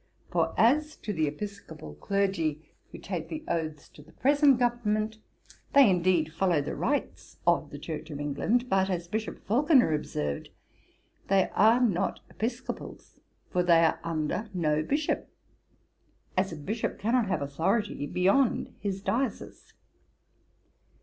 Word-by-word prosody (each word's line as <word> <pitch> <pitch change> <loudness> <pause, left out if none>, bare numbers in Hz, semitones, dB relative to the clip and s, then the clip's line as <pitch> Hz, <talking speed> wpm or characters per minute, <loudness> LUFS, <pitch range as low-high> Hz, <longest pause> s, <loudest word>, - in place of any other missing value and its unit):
For - - 0
as 300 +6 +3
to 210 - -5
the 160 -4 +1
episcopal 160 - -7
clergy 165 - -1 0.2
who - - -9
take - - -5
the 315 -1 -5
oaths 155 -3 -3
to - - -15
the 155 +2 -18
present 285 -1 +4
government, 220 -3 0 0.5
they 280 -3 +8
indeed 175 -4 +2
follow 175 -1 +2
the 140 - -3
rites - - -3
of - - +2
the 145 - -8
Church 155 +1 -6
of 145 -2 -6
England, 175 - 0
but, 190 -3 +2
as 175 -2 -2
Bishop 215 +4 -4
Falconer 255 - +4
observed, 75 - -3 0.8
"they 195 -1 +3
are 220 +5 +5
not 215 -8 +1
Episcopals; 240 +4 -6 0.3
for 180 - +2
they 170 -2 +5
are - - +1
under 165 +6 -2
no 155 -3 +1
bishop, 290 - -1 1.1
as 185 0 +1
a - - -5
bishop 210 +10 -3
cannot 230 +1 +1
have 180 - -1
authority 165 +4 -1
beyond 195 - +2
his 195 -1 -3
diocese." 260 +5 -3
190 Hz, 135 wpm, -28 LUFS, 160-230 Hz, 1.1 s, they